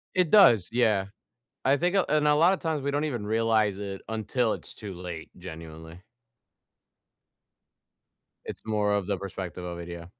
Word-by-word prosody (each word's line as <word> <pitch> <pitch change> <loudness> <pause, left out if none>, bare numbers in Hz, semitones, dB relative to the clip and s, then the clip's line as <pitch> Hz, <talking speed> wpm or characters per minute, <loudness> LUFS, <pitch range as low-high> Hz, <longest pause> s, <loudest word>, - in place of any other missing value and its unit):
It 180 -3 +3
does, 120 - +6
yeah. 110 -5 +2 0.6
I 135 +2 +3
think, 175 +5 0
uh 195 - +3
and 150 0 +2
a 150 - +5
lot 170 +5 +5
of 195 - -3
times, 160 -3 -2
we 140 - -1
don't 145 +2 0
even 120 -8 -3
realize 110 -2 +1
it 100 -1 -5
until 110 +1 0
it's - - -8
too 100 -3 -8
late 85 -2 -7
genuinely. 80 -1 -10 2.4
It's - - -7
more 105 -2 +1
of 100 -3 -1
the 100 - 0
perspective 95 -2 -6
of 85 -1 -6
it, 85 - -7
yeah. 85 -1 -7
105 Hz, 170 wpm, -27 LUFS, 90-140 Hz, 2.4 s, does